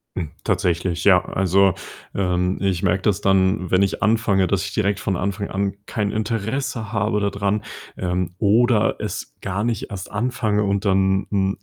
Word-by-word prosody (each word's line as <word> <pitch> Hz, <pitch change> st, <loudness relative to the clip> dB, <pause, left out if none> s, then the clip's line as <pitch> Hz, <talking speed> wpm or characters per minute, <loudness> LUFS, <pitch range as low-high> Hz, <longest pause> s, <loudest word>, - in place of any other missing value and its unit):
Hm, 80 Hz, -4 st, -4 dB
tatsächlich, 85 Hz, 0 st, 0 dB
ja. 95 Hz, -3 st, +5 dB
Also, 95 Hz, 0 st, +2 dB, 0.4 s
ähm, 90 Hz, -1 st, 0 dB
ich 95 Hz, -3 st, 0 dB
merke 95 Hz, 0 st, +1 dB
das 100 Hz, -1 st, +1 dB
dann, 95 Hz, -1 st, +2 dB
wenn 95 Hz, +2 st, +4 dB
ich 100 Hz, -, -1 dB
anfange, 105 Hz, -3 st, +2 dB
dass 95 Hz, 0 st, 0 dB
ich 100 Hz, -, -6 dB
direkt 100 Hz, 0 st, 0 dB
von 95 Hz, -, -1 dB
Anfang 100 Hz, +2 st, -2 dB
an 100 Hz, 0 st, -1 dB
kein 105 Hz, -4 st, -2 dB
Interesse 110 Hz, +1 st, -2 dB
habe 105 Hz, -2 st, 0 dB
da 100 Hz, 0 st, +1 dB
dran, 100 Hz, +1 st, -1 dB, 0.3 s
ähm, 90 Hz, -1 st, -2 dB
oder 110 Hz, +1 st, +3 dB
es -, -, -5 dB
gar 100 Hz, +2 st, -2 dB
nicht 115 Hz, -2 st, -2 dB
erst 95 Hz, -3 st, -7 dB
anfange 105 Hz, -1 st, 0 dB
und 100 Hz, 0 st, 0 dB
dann 95 Hz, 0 st, +2 dB
hm, 95 Hz, -1 st, 0 dB
100 Hz, 170 wpm, -22 LUFS, 95-105 Hz, 0.4 s, ja